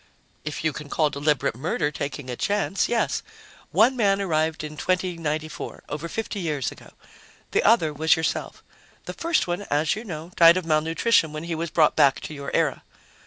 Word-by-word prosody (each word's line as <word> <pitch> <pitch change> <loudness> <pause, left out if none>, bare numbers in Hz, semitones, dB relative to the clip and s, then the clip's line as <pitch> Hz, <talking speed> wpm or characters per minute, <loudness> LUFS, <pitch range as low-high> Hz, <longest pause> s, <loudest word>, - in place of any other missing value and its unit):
"If 150 0 -5
you 160 -2 +1
can 150 0 -8
call 155 -1 +1
deliberate 145 -3 0
murder 145 +2 -1
taking 140 -1 -5
a 125 - -4
chance, 200 +5 0
yes. 235 -1 0 0.5
One 245 +4 +4
man 200 -5 +2
arrived 160 -4 0
in 150 0 -6
2094, 165 -3 -3
over 150 +3 -5
fifty 225 0 -4
years 150 -7 -2
ago. - - -15 0.6
The - - +2
other 170 -9 +3
was 160 +2 +3
yourself. 160 - -3 0.4
The - - -5
first 335 0 0
one, 175 +2 -2
as 150 +1 +1
you 215 - -6
know, 170 -5 -7
died 170 +1 +7
of 185 - -3
malnutrition 160 +2 +2
when 155 +1 -5
he 170 0 -3
was 165 +1 -3
brought 155 -1 +3
back 135 -1 +4
to - - -7
your 140 -1 -6
era." - - +1
160 Hz, 180 wpm, -24 LUFS, 150-185 Hz, 0.6 s, died